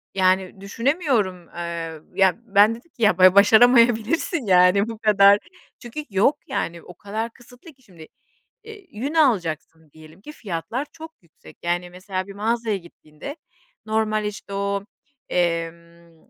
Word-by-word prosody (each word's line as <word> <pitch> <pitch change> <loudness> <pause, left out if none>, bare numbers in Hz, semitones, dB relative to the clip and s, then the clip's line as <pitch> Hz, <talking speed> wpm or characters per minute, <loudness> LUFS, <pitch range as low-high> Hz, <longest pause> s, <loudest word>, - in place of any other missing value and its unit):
yani 185 0 +1
düşünemiyorum. 225 - -1
Iıı, 165 -2 -6
ya 190 -1 +3
ben, 205 0 +4
dedim 250 +9 -17
ki, 235 - -6
"Ya 210 -4 +4
ba 185 0 +6
başaramayabilirsin 235 - +4
yani 185 +2 +4
bu 225 - -7
kadar." 200 -2 +5 0.4
Çünkü 245 +5 -7
yok, 205 +9 +2
yani, 170 0 -4
o 180 - -12
kadar 215 +5 -5
kısıtlı 245 +7 -17
ki 260 -1 -30
şimdi, 170 -8 -15 0.6
eee, 430 -3 -12
yün 270 +9 -5
alacaksın 165 - 0
diyelim 160 +2 -16
ki 300 +9 -11
fiyatlar 210 - -5
çok 320 0 -11
yüksek. 170 -2 -19
Yani, 175 +1 -2
mesela 185 +1 -5
bir 200 - -11
mağazaya 225 +1 -1
gittiğinde 170 - -11 0.5
normal 215 -1 0
işte 210 -1 -7
o, 200 0 -2 0.4
emm, 170 -1 -4
200 Hz, 140 wpm, -22 LUFS, 175-235 Hz, 0.6 s, ba